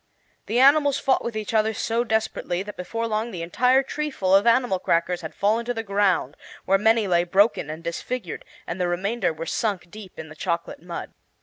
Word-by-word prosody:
The 225 Hz, -, -1 dB
animals 285 Hz, +1 st, +5 dB
fought 265 Hz, -, +1 dB
with 235 Hz, -2 st, -4 dB
each 215 Hz, +1 st, -4 dB
other 220 Hz, 0 st, +2 dB
so 230 Hz, +3 st, 0 dB
desperately 220 Hz, -5 st, -1 dB
that 210 Hz, +1 st, -8 dB
before 230 Hz, +6 st, -4 dB
long 220 Hz, +1 st, -1 dB
the 175 Hz, -6 st, -5 dB
entire 250 Hz, +10 st, +3 dB
treeful 270 Hz, -10 st, -2 dB
of 200 Hz, +4 st, +4 dB
animal 235 Hz, -5 st, +3 dB
crackers 175 Hz, 0 st, 0 dB
had 160 Hz, -, -8 dB
fallen 215 Hz, +4 st, +1 dB
to 245 Hz, 0 st, -2 dB
the 225 Hz, -, -3 dB
ground, 195 Hz, -, +1 dB, 0.3 s
where 195 Hz, +1 st, +3 dB
many 220 Hz, +1 st, +3 dB
lay 175 Hz, -2 st, +3 dB
broken 190 Hz, -2 st, +2 dB
and 160 Hz, +2 st, -7 dB
disfigured, 180 Hz, +4 st, -4 dB, 0.2 s
and 180 Hz, +2 st, -4 dB
the 180 Hz, -, +1 dB
remainder 190 Hz, +3 st, 0 dB
were 160 Hz, +1 st, -6 dB
sunk 190 Hz, -5 st, -2 dB
deep 210 Hz, -3 st, -11 dB
in 160 Hz, -, -7 dB
the 155 Hz, -, -11 dB
chocolate 170 Hz, 0 st, -3 dB
mud. 175 Hz, 0 st, -7 dB
205 Hz, 200 wpm, -24 LUFS, 175-230 Hz, 0.3 s, animals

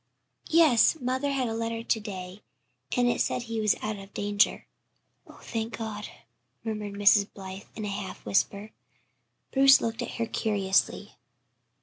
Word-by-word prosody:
"Yes. 320 Hz, -4 st, +5 dB
Mother 260 Hz, +2 st, -1 dB
had 270 Hz, -3 st, 0 dB
a 225 Hz, -, -3 dB
letter 230 Hz, 0 st, -3 dB
to 225 Hz, -, +1 dB
day, 190 Hz, -2 st, -7 dB, 0.6 s
and 245 Hz, 0 st, +3 dB
it 240 Hz, -, +1 dB
said 245 Hz, -, -1 dB
he 225 Hz, -1 st, -3 dB
was 210 Hz, -1 st, +3 dB
out 215 Hz, -1 st, -3 dB
of 195 Hz, 0 st, -13 dB
danger." 205 Hz, +1 st, +1 dB, 0.6 s
"Oh, -, -, -15 dB
thank 225 Hz, 0 st, -4 dB
God," 215 Hz, -2 st, -5 dB, 0.6 s
murmured 210 Hz, -2 st, -4 dB
Mrs. 200 Hz, 0 st, +4 dB
Blythe, 190 Hz, 0 st, -9 dB
in 215 Hz, -, -5 dB
a -, -, -3 dB
half 195 Hz, -1 st, -6 dB
whisper. 200 Hz, +2 st, 0 dB, 0.8 s
Bruce 270 Hz, 0 st, +7 dB
looked 225 Hz, 0 st, -3 dB
at -, -, -5 dB
her 230 Hz, -, -1 dB
curiously. 205 Hz, -4 st, 0 dB
220 Hz, 150 wpm, -27 LUFS, 205-235 Hz, 0.8 s, Bruce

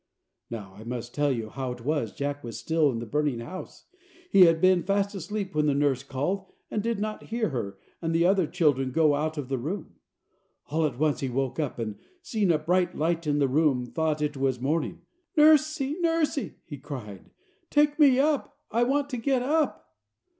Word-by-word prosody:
Now 105 Hz, -5 st, -7 dB
I 105 Hz, +3 st, -12 dB
must 120 Hz, 0 st, -5 dB
tell 145 Hz, -1 st, +1 dB
you 115 Hz, -4 st, -3 dB
how 130 Hz, +1 st, -4 dB
it 120 Hz, -1 st, -12 dB
was 145 Hz, -7 st, 0 dB
Jack 145 Hz, 0 st, -4 dB
was 115 Hz, -2 st, -6 dB
still 155 Hz, +5 st, +2 dB
in 115 Hz, -, -3 dB
the 115 Hz, -, -4 dB
burning 145 Hz, 0 st, 0 dB
house. 155 Hz, +11 st, -8 dB, 0.5 s
He 190 Hz, -2 st, +8 dB
had 165 Hz, -1 st, +4 dB
been 185 Hz, 0 st, +4 dB
fast 200 Hz, +2 st, 0 dB
asleep 195 Hz, +1 st, -4 dB
when 150 Hz, 0 st, +2 dB
the 140 Hz, -, +2 dB
nurse 140 Hz, -3 st, +2 dB
called, 145 Hz, +9 st, -3 dB, 0.2 s
and 210 Hz, -, 0 dB
did 230 Hz, +1 st, -1 dB
not 215 Hz, +1 st, -4 dB
hear 225 Hz, -2 st, -1 dB
her 105 Hz, -8 st, -4 dB, 0.2 s
and 165 Hz, -1 st, -1 dB
the 165 Hz, +1 st, +3 dB
other 185 Hz, -2 st, +3 dB
children 145 Hz, -7 st, +1 dB
go 155 Hz, +1 st, +4 dB
out 155 Hz, +2 st, -1 dB
of 145 Hz, -3 st, -4 dB
the 135 Hz, -1 st, -2 dB
room. 165 Hz, +8 st, -5 dB, 0.7 s
All 155 Hz, +1 st, +2 dB
at 125 Hz, -5 st, -7 dB
once 150 Hz, 0 st, +1 dB
he 135 Hz, -, -2 dB
woke 135 Hz, +3 st, -2 dB
up, 150 Hz, -4 st, -2 dB
and 110 Hz, -3 st, -4 dB, 0.2 s
seeing 210 Hz, -5 st, +1 dB
a 160 Hz, -, +3 dB
bright 180 Hz, +3 st, +1 dB
light 165 Hz, +1 st, 0 dB
in 145 Hz, 0 st, +2 dB
the 140 Hz, -2 st, +3 dB
room, 135 Hz, -2 st, +2 dB
thought 155 Hz, +3 st, -1 dB
it 150 Hz, 0 st, -1 dB
was 135 Hz, -2 st, 0 dB
morning. 150 Hz, +4 st, -1 dB, 0.3 s
"Nursie, 305 Hz, -2 st, +5 dB
nursie!" 325 Hz, -4 st, 0 dB
he 145 Hz, -4 st, -8 dB
called, 120 Hz, -9 st, -8 dB, 0.4 s
"take 295 Hz, +1 st, +3 dB
me 275 Hz, -4 st, +6 dB
up; 290 Hz, +1 st, +1 dB
I 230 Hz, -, +1 dB
want 275 Hz, +3 st, +2 dB
to 250 Hz, -, -2 dB
get 255 Hz, +1 st, +1 dB
up." 300 Hz, +2 st, 0 dB
155 Hz, 200 wpm, -27 LUFS, 135-200 Hz, 0.7 s, He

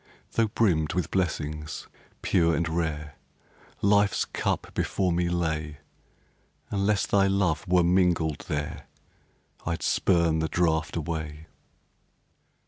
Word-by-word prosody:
Tho' 115 Hz, -1 st, +2 dB
brimmed 90 Hz, -8 st, +1 dB
with 90 Hz, -, -1 dB
blessings, 75 Hz, -4 st, -2 dB, 0.4 s
pure 85 Hz, -3 st, +3 dB
and 85 Hz, +2 st, 0 dB
rare, 80 Hz, -3 st, -3 dB, 0.7 s
Life's 100 Hz, 0 st, +3 dB
cup -, -, -2 dB
before 95 Hz, -2 st, 0 dB
me 85 Hz, 0 st, +1 dB
lay, 80 Hz, -3 st, -2 dB, 0.9 s
Unless 100 Hz, 0 st, +1 dB
thy 100 Hz, -1 st, +3 dB
love 95 Hz, -4 st, +1 dB
were 90 Hz, 0 st, +4 dB
mingled 85 Hz, -4 st, +2 dB
there, 75 Hz, -1 st, -4 dB, 0.8 s
I'd 85 Hz, 0 st, -3 dB
spurn 85 Hz, -3 st, +2 dB
the 80 Hz, 0 st, -1 dB
draft 80 Hz, -1 st, +1 dB
away. 80 Hz, -1 st, -4 dB
85 Hz, 110 wpm, -27 LUFS, 80-95 Hz, 0.9 s, were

